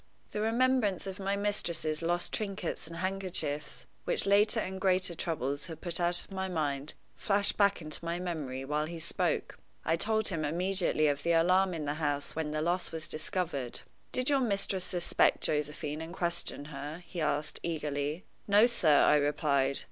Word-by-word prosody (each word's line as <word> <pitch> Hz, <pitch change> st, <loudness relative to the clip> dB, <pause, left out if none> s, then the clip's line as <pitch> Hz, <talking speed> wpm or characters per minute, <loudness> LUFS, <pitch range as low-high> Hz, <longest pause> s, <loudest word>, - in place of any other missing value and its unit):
The 210 Hz, -, -2 dB
remembrance 225 Hz, -4 st, +2 dB
of 195 Hz, +1 st, -6 dB
my 195 Hz, +1 st, 0 dB
mistress's 170 Hz, -6 st, -1 dB
lost 175 Hz, +1 st, 0 dB
trinkets 195 Hz, -6 st, -3 dB
and 165 Hz, -, -8 dB
handkerchiefs, 175 Hz, -5 st, -1 dB, 0.2 s
which -, -, +2 dB
later 210 Hz, +3 st, +4 dB
and 190 Hz, -2 st, -4 dB
greater 185 Hz, -2 st, +3 dB
troubles 145 Hz, -4 st, -3 dB
had 160 Hz, -2 st, -8 dB
put 175 Hz, -1 st, -2 dB
out 175 Hz, 0 st, +3 dB
of -, -, -18 dB
my 190 Hz, 0 st, -2 dB
mind, 150 Hz, -4 st, -2 dB, 0.2 s
flashed 200 Hz, -1 st, +2 dB
back 200 Hz, -4 st, +3 dB
into 155 Hz, +2 st, -5 dB
my 170 Hz, +1 st, -2 dB
memory 150 Hz, -7 st, -4 dB
while 150 Hz, +2 st, 0 dB
he 170 Hz, +1 st, -6 dB
spoke. 160 Hz, -, -2 dB, 0.3 s
I 165 Hz, -, +3 dB
told 220 Hz, +5 st, +1 dB
him 165 Hz, -5 st, -2 dB
immediately 175 Hz, 0 st, +1 dB
of 145 Hz, -1 st, 0 dB
the 170 Hz, +3 st, +2 dB
alarm 180 Hz, +2 st, +4 dB
in 155 Hz, -2 st, -4 dB
the 145 Hz, -, -1 dB
house 145 Hz, -2 st, -1 dB
when 160 Hz, -1 st, -2 dB
the 155 Hz, 0 st, -1 dB
loss 175 Hz, +2 st, 0 dB
was 160 Hz, -1 st, -5 dB
discovered. 155 Hz, -, -3 dB, 0.3 s
"Did 255 Hz, 0 st, -1 dB
your 280 Hz, -2 st, +4 dB
mistress 195 Hz, -5 st, 0 dB
suspect 175 Hz, -2 st, +2 dB
Josephine 150 Hz, 0 st, -1 dB
and 165 Hz, +2 st, -7 dB
question 170 Hz, -5 st, -2 dB
her?" 145 Hz, +5 st, -6 dB
he 170 Hz, -1 st, -5 dB
asked, 150 Hz, 0 st, -1 dB
eagerly. 150 Hz, 0 st, -2 dB, 0.2 s
"No, 205 Hz, +2 st, +6 dB
sir," 165 Hz, -11 st, +4 dB
I 150 Hz, -, +6 dB
replied. 140 Hz, -2 st, +1 dB
170 Hz, 175 wpm, -31 LUFS, 150-195 Hz, 0.3 s, No